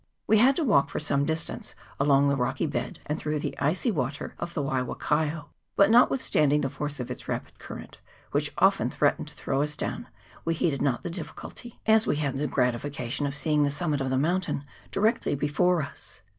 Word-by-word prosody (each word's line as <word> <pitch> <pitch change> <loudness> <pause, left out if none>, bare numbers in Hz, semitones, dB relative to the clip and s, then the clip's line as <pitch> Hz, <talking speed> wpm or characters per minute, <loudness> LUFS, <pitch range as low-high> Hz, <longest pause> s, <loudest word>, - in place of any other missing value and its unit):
We 220 - +4
had 265 +4 +5
to 330 - 0
walk 145 - +4
for - - -3
some 140 -2 +1
distance 160 +2 -3 0.2
along 140 0 +4
the 140 - +3
rocky 130 +3 0
bed 145 - -3
and 150 +1 -2
through 150 0 -1
the 150 - -3
icy 180 - +1
water 145 - -3
of 175 0 -5
the 145 - 0
Waiwakaio; 145 +3 -1 0.3
but 200 +2 +5
not 240 +2 +7
withstanding 150 - +2
the 135 -3 -1
force 145 +1 -4
of 125 - -4
its - - -7
rapid - - -4
current, - - -9 0.3
which - - +1
often - - +4
threatened - - +1
to - - -10
throw 135 - -1
us 150 0 -1
down, - - -4 0.4
we 165 0 0
heeded 155 -3 0
not 135 -4 0
the 175 - -4
difficulty, 180 +7 -8
as 220 0 +5
we - - +2
had 140 -3 -1
the 150 +2 0
gratification 125 +2 -1
of 140 - -4
seeing 150 0 +2
the 145 - +2
summit 145 -1 -1
of 135 - -1
the 130 - +1
mountain 170 0 0 0.3
directly 215 - +1
before 155 +4 +2
us. 140 - -10
150 Hz, 200 wpm, -27 LUFS, 140-170 Hz, 0.4 s, not